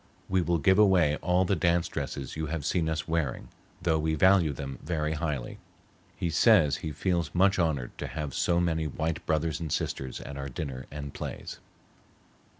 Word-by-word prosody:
We 95 -1 +2
will 85 0 +1
give 95 +5 +4
away 90 -8 +5
all 90 +1 +2
the 100 - +1
dance 85 +1 +2
dresses 65 -2 -5
you 80 0 -3
have 75 -2 -3
seen 85 -1 +1
us 80 +1 -2
wearing, 80 -6 -2 0.3
though 80 -3 +2
we 80 0 0
value 90 -1 +5
them 65 0 -6
very 80 -2 -1
highly.' 75 -6 -3 0.6
He 85 - -1
says 85 -4 +5
he 80 -4 -5
feels 85 0 -1
much 95 +2 +4
honored 75 -8 0
to - - -3
have 75 -4 -5
so 85 -1 +2
many 80 -2 0
white 80 +2 -3
brothers 80 0 0
and 80 -3 -4
sisters 65 -2 -2
at 70 - -8
our 70 0 -4
dinner 65 -2 -5
and 70 -1 -7
plays." - - -6
80 Hz, 180 wpm, -28 LUFS, 75-85 Hz, 0.6 s, away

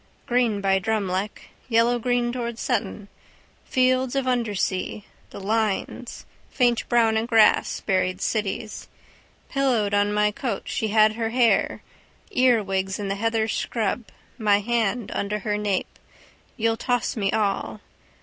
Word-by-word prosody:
Green 240 -4 +1
by 195 -1 +2
Drumleck. 200 -1 -2 0.2
Yellowgreen 240 +1 +2
towards 235 -2 -4
Sutton. 215 -4 -2 0.6
Fields 255 0 +1
of 270 -1 0
undersea, 210 -5 -1 0.2
the - - -9
lines 220 +3 -2 0.2
faint 240 -3 +1
brown 230 -2 +3
in 225 +1 -1
grass, 225 -3 +4
buried 185 -2 0
cities. 210 0 -3 0.6
Pillowed 245 -7 +1
on 205 0 +2
my 210 0 +2
coat 240 +3 -3
she 220 - -2
had 215 0 +4
her 225 0 -2
hair, 235 -1 +2 0.5
earwigs 195 -7 +2
in 200 -1 -4
the 195 - -1
heather 225 +1 0
scrub 225 +1 -2 0.3
my 205 -2 +3
hand 230 0 -1
under 200 +1 -2
her 210 0 -2
nape, 205 -2 -2 0.6
you'll 225 0 +1
toss 245 +1 -1
me 200 -4 0
all. 195 - -1
220 Hz, 130 wpm, -24 LUFS, 205-240 Hz, 0.6 s, grass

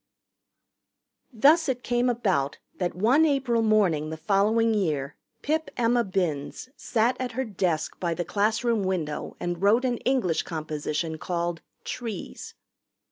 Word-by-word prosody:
Thus 290 +7 +4
it 250 -1 -2
came 245 +1 +1
about 190 - 0 0.2
that 175 -2 -1
one 240 - +4
April 270 -6 +2
morning 195 -9 +2
the 160 - -5
following 210 +6 +2
year 150 -9 -1 0.3
Pip 315 +2 0
Emma 240 0 +3
Binns 180 - -2
sat 235 +2 +1
at 255 -2 -3
her 260 +3 -2
desk 180 -7 -2
by 170 -2 -1
the 175 - -3
classroom 215 +4 +1
window 170 -6 -3
and 175 0 -3
wrote 220 +6 +4
an 245 -2 0
English 240 -12 +1
composition 155 0 -3
called 170 -1 -2 0.2
"Trees." 230 -4 -6
205 Hz, 135 wpm, -26 LUFS, 170-240 Hz, 0.3 s, Thus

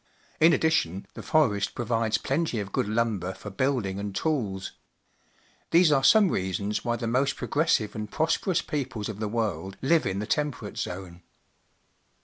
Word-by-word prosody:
In 160 +2 +7
addition, 100 - +1
the - - -8
forest 110 -11 +1
provides 115 -2 0
plenty 135 -3 -1
of 100 -1 -5
good - - 0
lumber 105 -5 -1
for 105 - -9
building 105 -4 -1
and 100 -1 -5
tools. 105 -11 -1 1.0
These 170 -1 +5
are 135 -2 +3
some 210 +4 +6
reasons 100 - -2
why 120 -1 0
the 120 0 -4
most 130 +4 +1
progressive 145 -9 +1
and 105 -1 -5
prosperous 165 - 0
peoples 125 -7 -3
of 105 -2 -6
the 110 - -1
world 100 -5 -2
hve 160 0 +3
in 95 0 -2
the 105 - -2
Temperate 140 -6 -2
Zone. 90 -1 -6
110 Hz, 155 wpm, -27 LUFS, 100-145 Hz, 1.0 s, In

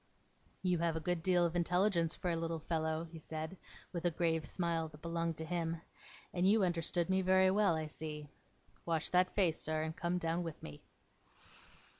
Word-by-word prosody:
'You 180 -2 +2
have 165 -1 +1
a - - 0
good 175 +1 -1
deal 175 0 +3
of 170 0 -1
intelligence 175 -1 +2
for 180 - -1
a - - +1
little 165 0 -2
fellow,' 160 0 -1
he 165 -1 -10
said, 160 +3 -5 0.4
with 170 - -3
a 175 - +4
grave 160 -2 0
smile 170 -2 -1
that 155 -1 -15
belonged 165 -1 -1
to 160 - -3
him, 165 -1 -1 0.5
'and 180 +1 +3
you 215 0 +5
understood 170 -1 0
me 190 0 +2
very 185 0 +5
well, 200 -4 +3
I 160 0 -2
see. 150 -1 -6 0.6
Wash 165 -2 0
that 185 0 +3
face, 175 -6 +3
sir, 155 0 -1
and 160 0 -3
come 175 +1 -1
down 165 0 0
with 165 -3 -6
me. 75 0 -9
170 Hz, 190 wpm, -35 LUFS, 160-180 Hz, 0.6 s, you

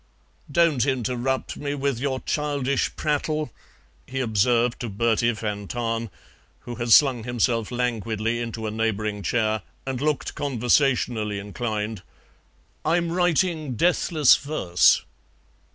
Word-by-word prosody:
"Don't 160 -5 +3
interrupt 130 0 -1
me 145 0 -3
with 140 -3 -1
your 130 -1 -2
childish 140 -2 -1
prattle," 150 -2 -1 0.6
he 135 +1 -4
observed 120 +1 +2
to 120 - -4
Bertie 115 +3 +1
van 105 -2 -4
Tahn, 115 -1 -2 0.5
who 120 - -7
had 120 0 -4
slung 130 -3 +6
himself 115 -1 0
languidly 115 -2 -1
into 115 -1 -4
a 110 - -2
neighbouring 110 -1 -1
chair 110 +1 0 0.2
and 135 -1 -3
looked 150 0 -1
conversationally 120 -5 +1
inclined; 105 0 -4 0.8
"I'm 170 +1 +1
writing 170 -5 +1
deathless 160 0 +4
verse." 140 - +2
120 Hz, 115 wpm, -24 LUFS, 110-140 Hz, 0.8 s, slung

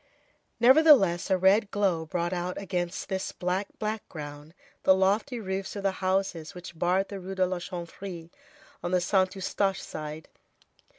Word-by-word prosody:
Nevertheless, 245 - +6
a 190 - +4
red 195 +3 +4
glow 185 -6 0
brought 175 +2 -1
out 180 0 -3
against 180 -2 -3
this 190 -1 -2
black 185 +2 -2
background 155 -8 -6 0.3
the 190 - +5
lofty 205 +7 +1
roofs 190 -1 -4
of 200 - -5
the 195 - +2
houses 185 -4 -1
which 180 -1 -9
barred 185 +3 +1
the 200 - -6
Rue 190 +1 -6
de 185 -1 +3
la 185 0 -2
Chanvrerie 170 0 -7 0.5
on - - -3
the 180 0 +3
Saint 185 +2 +1
Eustache 195 0 0
side. 155 0 -7
185 Hz, 155 wpm, -28 LUFS, 175-195 Hz, 0.5 s, Nevertheless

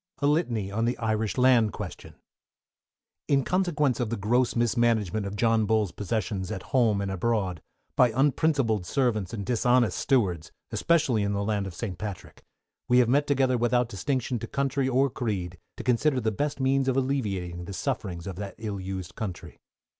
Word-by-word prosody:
A 145 - -1
LITANY 125 - +1
ON 115 +3 0
THE 120 - 0
IRISH 110 -3 -1
LAND 125 -5 +4
QUESTION. - - -8 1.1
In 140 -1 +3
consequence 150 -8 +1
of 120 -3 -1
the 115 - -2
gross 120 +5 +1
mismanagement 115 -4 +1
of 100 - -5
John 115 0 +2
Bull's 110 -4 +1
possessions 100 -2 -3
at 95 - -5
home 115 -6 +3
and 100 -1 -2
abroad, 95 -3 -1 0.3
by 125 -2 +5
unprincipled 135 - +2
servants 110 -5 0
and 100 -4 -5
dishonest 120 -2 +2
stewards; 90 - +1 0.2
especially 150 -10 +2
in 100 0 0
the 100 0 -1
land 100 -2 -1
of 90 - -8
St. 95 -4 -5
Patrick, 100 -4 -7 0.4
we 125 - +4
have 125 -2 +4
met 145 +3 +3
together 130 -3 +2
without 120 0 +2
distinction 125 +3 -2
to - - -6
country 135 -1 0
or 135 +2 +3
creed, 100 -9 -3 0.2
to - - -6
consider 130 +3 +2
the 110 -2 0
best 145 +6 -2
means 135 0 +2
of 130 0 +1
alleviating 100 -11 -2
the 100 - -7
sufferings 95 -8 -3
of 95 -3 -6
that 100 0 -6
ill 105 -3 -4
used 95 -2 -5
country. 95 -5 -6
115 Hz, 175 wpm, -27 LUFS, 100-130 Hz, 1.1 s, by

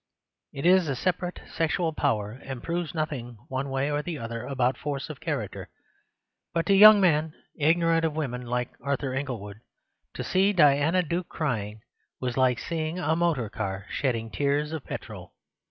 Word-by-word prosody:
It 140 - -6
is 180 -1 +5
a 135 - 0
separate 180 +4 -2
sexual 165 0 0
power, 105 -7 0
and 130 +1 -8
proves 170 0 -3
nothing 130 -7 -3
one 135 +1 -2
way 135 +2 0
or 145 0 0
the 165 0 -5
other 115 -2 -5
about 130 -2 +1
force 145 +1 -4
of 145 - -10
character. 145 - -4 0.9
But 165 - +1
to 200 - +3
young 210 +1 +10
men 160 -4 +2 0.2
ignorant 165 +2 +3
of 160 -2 0
women, 130 -6 -2
like 125 0 -2
Arthur 140 0 -2
Inglewood, 115 -7 -4 0.6
to - - -3
see 195 +2 +2
Diana 155 +2 +4
Duke 170 +2 -3
crying 110 -8 -3 0.4
was 125 -2 -2
like 130 -2 +3
seeing 160 +5 -3
a 160 -3 +1
motor 165 -9 +1
car 100 -3 -4
shedding 115 -4 -1
tears 145 +4 0
of 160 -4 -4
petrol. - - -8
145 Hz, 165 wpm, -27 LUFS, 125-165 Hz, 0.9 s, young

